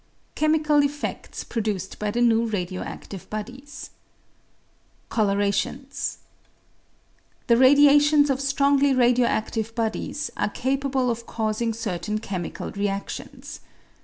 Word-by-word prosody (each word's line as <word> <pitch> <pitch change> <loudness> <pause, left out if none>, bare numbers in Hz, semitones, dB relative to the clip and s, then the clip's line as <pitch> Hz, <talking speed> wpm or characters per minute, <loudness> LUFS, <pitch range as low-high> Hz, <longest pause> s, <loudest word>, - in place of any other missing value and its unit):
Chemical 305 -1 +3
Effects 285 +1 -3
produced 205 -5 -3
by 210 - -1
the 235 +4 -1
Neza 230 -1 +3
Radio 185 -2 -3
active 195 -3 -8
Bodies. 250 +7 -7 1.2
Colourations. 205 +6 0 0.7
— - - -39
The 235 - +4
radiations 290 +2 +6
of 265 0 -1
strongly 280 0 +3
radio 245 -1 +4
adive 220 +1 -2
bodies 230 +6 -2
are 205 - 0
capable 265 +1 0
of 230 0 -6
causing 220 +1 -1
certain 215 -2 -3
chemical 190 -5 -5
readions. 200 0 -5
235 Hz, 105 wpm, -24 LUFS, 210-275 Hz, 1.2 s, radiations